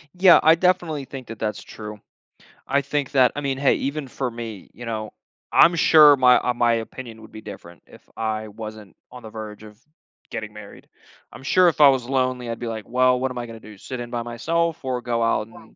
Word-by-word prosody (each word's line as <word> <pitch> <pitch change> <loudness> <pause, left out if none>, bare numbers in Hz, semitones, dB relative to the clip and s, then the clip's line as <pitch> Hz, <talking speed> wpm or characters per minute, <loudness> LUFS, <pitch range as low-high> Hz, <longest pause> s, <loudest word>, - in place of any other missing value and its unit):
Yeah, 180 -1 +7
I 160 +1 +7
definitely 170 -5 0
think 130 -2 -9
that 115 -1 -9
that's 105 -2 -3
true. 105 -1 -9 0.7
I 140 +1 +2
think 140 0 -3
that 130 -3 +4
I 145 - -3
mean, 135 -2 -2
hey, 135 0 +3
even 140 +1 -3
for 130 0 -3
me, 115 -4 -8
you 120 - -10
know, 110 -2 -4 0.4
I'm 170 0 +6
sure 155 -3 +7
my, 125 -2 +5
uh, 125 - 0
my 120 -1 +2
opinion 115 0 -7
would 110 - -14
be 110 - -10
different, 90 -5 -11
if - - -18
I 110 -1 -3
wasn't 110 -1 -10 0.2
on 125 - -11
the 110 - -9
verge 110 -1 -9
of 105 -1 -14 0.5
getting 110 -1 -6
married. 105 -1 -13 0.5
I'm 120 +4 -12
sure 180 +6 +4
if 160 -3 +1
I 145 - +9
was 130 -3 +1
lonely, 130 -2 -1
I'd 115 - -4
be 120 - -5
like, 110 -2 -6
"Well, 125 +1 +3
what 130 0 -1
am 125 - -8
I 120 - -4
gonna 115 -1 -10
do? 105 -2 -13
Sit 130 +5 -7
in 120 0 -7
by 120 - -2
myself, 165 +8 -2
or 125 -1 -2
go 120 -1 -2
out, 110 -2 0
and 110 -1 -17
120 Hz, 225 wpm, -23 LUFS, 110-135 Hz, 0.7 s, I